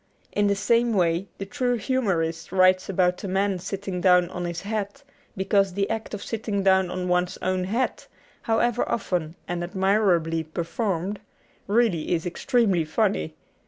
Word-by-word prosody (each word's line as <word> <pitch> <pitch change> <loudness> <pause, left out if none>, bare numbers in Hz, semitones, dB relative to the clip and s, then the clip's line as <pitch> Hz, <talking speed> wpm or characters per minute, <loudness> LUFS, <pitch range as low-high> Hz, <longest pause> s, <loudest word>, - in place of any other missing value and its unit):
In 205 0 +2
the 200 - +2
same 235 +3 +2
way 175 -1 +1
the 195 - -5
true 245 +3 0
humorist 190 -10 -1
writes 185 0 +4
about 180 0 +1
a - - -3
man 190 0 0
sitting 190 0 -4
down 180 -1 +4
on 180 -1 -4
his 170 -1 -4
hat 210 +5 -4 0.3
because 195 0 +2
the 200 +1 0
act 225 -1 -3
of 205 - -7
sitting 215 -3 -2
down 190 -1 +4
on 180 0 -3
one's 180 0 +1
own 185 0 0
hat 230 +7 -2 0.3
(however 235 +1 +1
often 175 -7 -2
and 175 0 -2
admirably 180 -3 +1
per 160 +2 -4
formed) 190 +1 -2 0.5
really 200 -7 +2
is 165 - -3
extremely 195 - +1
funny. 155 - 0
190 Hz, 160 wpm, -25 LUFS, 175-210 Hz, 0.5 s, writes